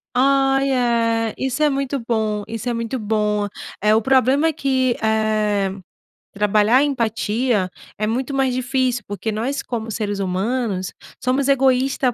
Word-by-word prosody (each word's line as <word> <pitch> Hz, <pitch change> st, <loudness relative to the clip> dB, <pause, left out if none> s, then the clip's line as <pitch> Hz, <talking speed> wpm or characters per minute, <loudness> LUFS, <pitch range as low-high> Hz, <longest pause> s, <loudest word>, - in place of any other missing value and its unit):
Ai, 270 Hz, +1 st, +3 dB
é, 230 Hz, -3 st, +1 dB
isso 265 Hz, +3 st, -2 dB
é 300 Hz, -, +5 dB
muito 275 Hz, 0 st, -2 dB
bom, 220 Hz, -3 st, -1 dB
isso 225 Hz, +1 st, -6 dB
é -, -, +1 dB
muito 230 Hz, +2 st, -3 dB
bom! 210 Hz, -1 st, 0 dB, 0.4 s
Eh, 210 Hz, +1 st, +4 dB
o 220 Hz, -, +4 dB
problema 265 Hz, +4 st, +3 dB
é -, -, 0 dB
que, 260 Hz, -4 st, +1 dB
eh, 215 Hz, -2 st, +1 dB, 0.6 s
trabalhar 210 Hz, +4 st, +3 dB
empatia 230 Hz, -5 st, 0 dB, 0.3 s
é 215 Hz, -, -1 dB
muito 255 Hz, +5 st, -2 dB
mais 265 Hz, -2 st, +1 dB
difícil, 255 Hz, -1 st, 0 dB
porque 205 Hz, +2 st, -4 dB
nós, 255 Hz, +7 st, -2 dB
como 225 Hz, -2 st, -5 dB
seres 205 Hz, -2 st, -3 dB
humanos, 195 Hz, +1 st, -2 dB, 0.3 s
somos 265 Hz, +2 st, +1 dB
egoísta 265 Hz, -1 st, +2 dB
235 Hz, 145 wpm, -20 LUFS, 215-265 Hz, 0.6 s, é